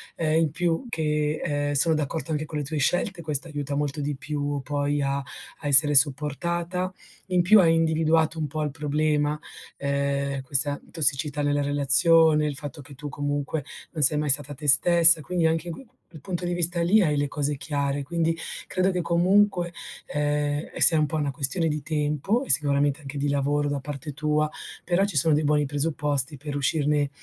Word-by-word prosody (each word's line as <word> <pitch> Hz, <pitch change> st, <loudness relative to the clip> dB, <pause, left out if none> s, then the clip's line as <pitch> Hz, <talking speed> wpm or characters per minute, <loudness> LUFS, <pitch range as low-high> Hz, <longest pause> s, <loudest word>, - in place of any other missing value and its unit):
ehm, 160 Hz, -1 st, +1 dB
in 160 Hz, -3 st, +1 dB
più 170 Hz, -, -1 dB
che, 150 Hz, -5 st, -1 dB
ehm, 145 Hz, 0 st, -1 dB
sono 160 Hz, +3 st, +4 dB
d'accordo 155 Hz, +2 st, -3 dB
anche 155 Hz, 0 st, -2 dB
con 150 Hz, 0 st, -5 dB
le -, -, -3 dB
tue 155 Hz, +2 st, -4 dB
scelte, 175 Hz, +5 st, 0 dB
questo 155 Hz, +1 st, -3 dB
aiuta 145 Hz, -1 st, -4 dB
molto 145 Hz, 0 st, -2 dB
di 145 Hz, 0 st, -2 dB
più 145 Hz, 0 st, -4 dB
poi 145 Hz, +1 st, -1 dB
a 140 Hz, 0 st, -1 dB, 0.5 s
a -, -, -3 dB
essere 145 Hz, +1 st, +5 dB
supportata. 170 Hz, +6 st, 0 dB, 0.4 s
In 180 Hz, -1 st, +2 dB
più 210 Hz, +5 st, +6 dB
hai 165 Hz, -3 st, +4 dB
individuato 160 Hz, 0 st, +1 dB
un 155 Hz, -, -2 dB
po' 155 Hz, +2 st, -3 dB
il 150 Hz, -, -2 dB
problema, 150 Hz, 0 st, 0 dB, 0.4 s
ehm, 140 Hz, 0 st, -2 dB
questa, 145 Hz, +2 st, +1 dB
mhmm, -, -, -23 dB
tossicità 150 Hz, -2 st, +1 dB
nella 145 Hz, 0 st, 0 dB
relazione, 150 Hz, +3 st, +4 dB
il 145 Hz, -, -3 dB
fatto 145 Hz, +1 st, -7 dB
che 140 Hz, +1 st, -14 dB
tu 145 Hz, +2 st, -7 dB
comunque 145 Hz, +1 st, -3 dB, 0.3 s
non 160 Hz, -, -4 dB
sei 150 Hz, +2 st, +4 dB
mai 150 Hz, 0 st, -1 dB
stata 145 Hz, +1 st, +2 dB
te 145 Hz, +2 st, -8 dB
stessa, 170 Hz, +4 st, +6 dB
quindi 170 Hz, +2 st, -2 dB
anche 160 Hz, +1 st, 0 dB
in 170 Hz, -, -4 dB
q -, -, -10 dB
q 240 Hz, -, -27 dB, 0.2 s
il 155 Hz, -, -10 dB
punto 175 Hz, +4 st, -5 dB
di 175 Hz, 0 st, -2 dB
vista 175 Hz, 0 st, 0 dB
lì 195 Hz, +6 st, +4 dB
hai 155 Hz, -5 st, +1 dB
le 145 Hz, 0 st, -1 dB
cose 145 Hz, +1 st, -2 dB
chiare, 140 Hz, 0 st, -2 dB
quindi 165 Hz, +2 st, -1 dB, 0.3 s
credo 185 Hz, +1 st, 0 dB
che 180 Hz, -, -2 dB
comunque, 180 Hz, +1 st, +2 dB, 0.4 s
ehm, 145 Hz, 0 st, -2 dB
e -, -, -7 dB
sia 160 Hz, -2 st, +6 dB
un 150 Hz, -, +2 dB
po' 160 Hz, -, -5 dB
una 145 Hz, -2 st, -1 dB
questione 155 Hz, +5 st, 0 dB
di 150 Hz, 0 st, -3 dB
tempo 150 Hz, -, -1 dB
e -, -, -11 dB
sicuramente 140 Hz, +1 st, +2 dB
anche 140 Hz, 0 st, -8 dB
di 140 Hz, +1 st, -1 dB
lavoro 145 Hz, +1 st, 0 dB
da 145 Hz, -1 st, -2 dB
parte 145 Hz, +1 st, -7 dB
tua, 150 Hz, +1 st, 0 dB, 0.3 s
però 180 Hz, +3 st, +1 dB
ci 200 Hz, -, -5 dB
sono 155 Hz, +3 st, +3 dB
dei 150 Hz, +1 st, +1 dB
buoni 150 Hz, 0 st, +2 dB
presupposti 145 Hz, 0 st, -1 dB
per 145 Hz, +1 st, -6 dB
uscirne 145 Hz, 0 st, 0 dB
150 Hz, 200 wpm, -25 LUFS, 145-165 Hz, 0.5 s, più